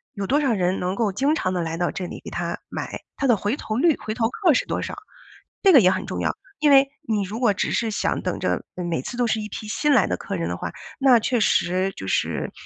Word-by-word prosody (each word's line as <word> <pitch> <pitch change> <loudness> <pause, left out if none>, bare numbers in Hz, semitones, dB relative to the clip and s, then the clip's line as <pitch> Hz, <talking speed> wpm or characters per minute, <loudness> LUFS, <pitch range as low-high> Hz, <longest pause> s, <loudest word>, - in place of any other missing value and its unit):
有 200 - -3
多 280 +9 +2
少 275 -5 +2
人 185 -2 0
能 180 +1 -1
够 215 -2 +1
经 275 +10 +1
常 185 -10 -1
地 180 - -1
来 165 0 -3
到 175 +1 0
这 185 - -5
里 - - -8
给 - - -7
它 - - -3
买， - - -5 0.2
它 275 - 0
的 240 - +5
回 210 +6 -2
头 215 - -4
率、 305 +5 +3
回 215 - -5
头 225 -1 0
客 360 - +2
是 - - +1
多 - - -2
少？ - - -5 0.7
这 385 -2 +7
个 280 - +10
也 185 -4 +5
很 185 +1 -3
重 - - -3
要， - - 0 0.2
因 295 -1 +4
为 275 0 +6 0.2
你 215 -2 +1
如 205 +4 -5
果 235 -5 +3
只 - - -1
是 230 -2 0
想 210 - -1
等 - - -2
着， - - -1
嗯， 180 - -4
每 165 -6 -1
次 245 - -6
都 245 - +2
是 220 -1 0
一 210 - -5
批 215 - -7
新 295 +7 +1
来 225 -8 +4
的 - - -1
客 200 - -5
人 170 - -2
的 85 - -3
话， 85 - -5 0.3
那 260 -3 +6
确 240 +2 0
实 185 -2 +1
就 95 - -7
是 - - -1
215 Hz, 295 characters per minute, -23 LUFS, 185-260 Hz, 0.7 s, 个